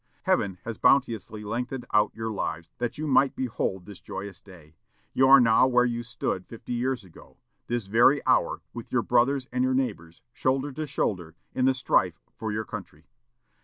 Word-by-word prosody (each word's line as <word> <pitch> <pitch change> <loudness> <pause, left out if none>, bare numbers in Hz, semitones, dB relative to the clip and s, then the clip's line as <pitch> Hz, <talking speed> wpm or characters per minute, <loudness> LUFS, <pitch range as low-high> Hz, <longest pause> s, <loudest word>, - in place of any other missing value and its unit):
Heaven 95 -2 +1
has 115 -1 -5
bounteously 110 -6 +2
lengthened 125 +4 -4
out 105 0 +4
your 110 0 -3
lives 85 -5 -4
that 120 +2 -2
you 155 - -3
might 135 -1 +3
behold 105 -7 -2
this 100 -3 -11
joyous 100 0 -7
day. 85 -5 -16 0.4
You 130 - +4
are 135 +1 +9
now 115 +1 +5
where 125 -1 +4
you 120 -1 -1
stood 115 -5 -4
fifty 115 +1 -7
years 125 0 -1
ago, 90 -4 -17 0.3
this 120 -3 -2
very 120 +8 +4
hour, - - +2
with - - -8
your - - +1
brothers 130 +2 +2
and 125 0 0
your 130 0 +1
neighbors, 85 -11 -3
shoulder 135 +2 0
to 155 +3 -5
shoulder, 90 - -2 0.2
in 130 - +1
the 130 0 +3
strife 130 - +1
for 110 -1 -4
your 110 +1 -2
country. 75 -4 -9
115 Hz, 180 wpm, -26 LUFS, 100-130 Hz, 0.4 s, are